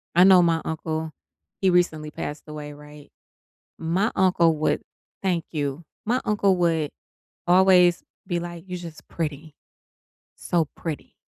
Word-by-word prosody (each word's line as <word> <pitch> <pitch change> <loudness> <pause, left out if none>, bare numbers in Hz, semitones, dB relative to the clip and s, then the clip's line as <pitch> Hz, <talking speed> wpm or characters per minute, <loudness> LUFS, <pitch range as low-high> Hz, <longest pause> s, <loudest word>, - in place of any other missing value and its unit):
I 180 - +7
know 190 -1 +8
my 165 -2 +2
uncle 160 0 -3 0.5
he 190 - +4
recently 160 -4 +1
passed 145 +1 -6
away, 150 -1 -7
right, 150 0 -14 0.7
my 180 +7 0
uncle 175 -4 +4
would 155 - +1 0.4
Thank 175 -3 0
you. 145 0 -3 0.2
My 245 +4 +1
uncle 200 -2 +3
would 165 -4 +1 0.6
always 180 -1 +5 0.2
be 175 -1 -1
like, 175 -1 -7
"You're 180 -1 -5
just 165 -3 -10
pretty, 155 -1 -5 0.8
so 165 -4 0
pretty." 160 -4 -6
165 Hz, 135 wpm, -24 LUFS, 155-180 Hz, 0.8 s, know